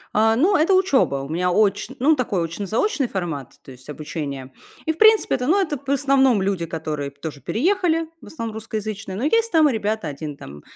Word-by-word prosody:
А, 225 +1 +4
ну, 350 - +3
это 345 +4 +4
учеба, 360 - +2
у 140 - -8
меня 180 +3 0
очн 200 +1 +1
ну 300 +5 +4
такой, 210 - -1
очно-заочный 215 - -1
формат, 165 - -5
то - - -12
есть 130 +2 -15
обучение, 145 -3 -6 0.3
и, 320 - +1
в 320 - -19
принципе, 440 0 +5
это, 250 -1 -3
ну, 375 +6 +4
это 325 -6 0
в 275 0 -10
основном 270 -4 +3
люди, 190 -4 -1
которые 155 -3 -4
тоже 145 +1 -8
переехали, 330 - +1
в - - -13
основном 230 -7 -6
русскоязычные, 215 -2 -5
но 225 - -3
есть 455 +9 +2
там 315 -2 +5
и - - -1
ребята: 215 -4 -2
1 145 0 -7
там, 75 +1 -11
220 Hz, 200 wpm, -22 LUFS, -, 0.3 s, принципе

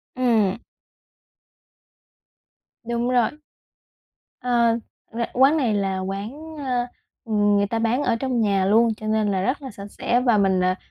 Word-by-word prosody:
Ừm. 225 -7 +2 2.3
Đúng 235 +1 -2
rồi. 245 -3 +3 1.1
À, 235 -2 +2 0.4
ra 235 +1 -2
quán 270 +5 +4
này 245 -8 +1
là 195 -2 -1
quán, 220 +12 -6
a, 250 -4 -1 0.4
ừm, 205 -2 +2
người 200 0 +1
ta 225 +2 -2
bán 230 +5 +1
ở - - +1
trong 250 0 -1
nhà 200 -3 +2
luôn 225 +3 +3
cho 215 - -7
nên 215 -1 +1
là 190 -1 0
rất 255 +9 -1
là 265 - -7
sạch 200 -1 -9
sẽ 240 - 0
và 240 -4 +3
mình, 190 -2 +2
à 185 0 +2
230 Hz, 155 wpm, -23 LUFS, 200-250 Hz, 2.3 s, quán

